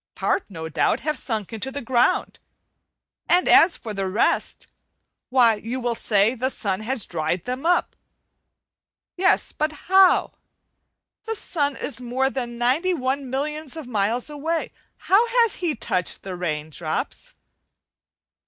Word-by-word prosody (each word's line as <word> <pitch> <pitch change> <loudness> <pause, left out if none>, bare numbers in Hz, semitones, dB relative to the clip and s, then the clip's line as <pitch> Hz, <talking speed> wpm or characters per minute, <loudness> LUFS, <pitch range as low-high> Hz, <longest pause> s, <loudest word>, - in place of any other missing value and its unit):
Part 395 - -1
no 160 -4 -6
doubt 160 - +1
have 305 +1 -1
sunk 220 -7 -4
into 225 +4 -3
the 285 - -4
ground, 245 0 +1 0.9
and 355 +1 +4
as 335 +1 +6
for 220 -3 -7
the 195 -1 -2
rest, 195 +4 0 0.6
why 250 -3 +5
you 225 +4 -4
will 240 -1 -1
say 215 0 +2
the 260 +1 -1
sun 195 -7 -2
has 230 +1 -2
dried 165 +2 -2
them 255 +5 -3
up. 355 - +2 1.2
Yes, 380 +2 +2
but 305 +1 -1 0.2
how? 380 -1 +5 0.9
The 450 0 -2
sun 290 -8 0
is 275 - -4
more 260 +2 0
than 240 -3 -4
ninety 285 +10 +1
one 265 -1 -2
millions 300 +2 -3
of 315 - -6
miles 225 +1 -1
away; 310 +3 -3 0.2
how 425 +5 +3 0.2
has 460 - -1
he 345 -4 -1
touched 185 -5 -2
the 190 -2 -5
rain 155 -3 -3
drops? 155 0 -4
250 Hz, 145 wpm, -23 LUFS, 210-305 Hz, 1.2 s, as